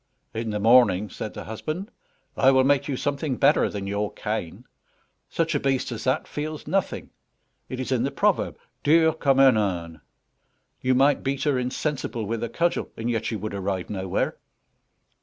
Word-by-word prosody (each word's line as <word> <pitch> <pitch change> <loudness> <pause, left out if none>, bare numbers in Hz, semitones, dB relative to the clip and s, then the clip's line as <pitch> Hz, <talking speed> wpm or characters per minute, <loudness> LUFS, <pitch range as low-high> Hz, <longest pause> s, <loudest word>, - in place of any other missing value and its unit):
"In 115 0 -3
the 105 -1 -2
morning," 105 -4 +4
said - - -6
the - - -6
husband, 155 - -5 0.4
"I 135 - +5
will 130 -1 +5
make 140 0 +2
you 135 -3 -2
something 140 0 -1
better - - +4
than 100 -1 -5
your 100 +1 -2
cane. 105 -6 -4 0.6
Such - - 0
a - - +1
beast 135 -2 0
as 115 - -5
that 130 +4 +1
feels 150 +1 -5
nothing; 195 0 -2 0.6
it 130 - -5
is 130 0 -3
in 125 -3 +2
the 135 - +1
proverb - - +1 0.2
dur 160 +1 +4
comme 140 -4 +2
un 135 -1 +7
âne; 85 -6 -2 0.8
you 130 0 +2
might 140 +3 +4
beat 135 0 -2
her 145 -4 +2
insensible 125 -2 -2
with 115 +2 -3
a 115 - -2
cudgel, 170 +1 0
and 115 +2 -2
yet 110 -1 -1
you 110 - -2
would 105 0 -5
arrive 95 -1 -3
nowhere." 95 -2 -2
125 Hz, 175 wpm, -25 LUFS, 105-140 Hz, 0.8 s, un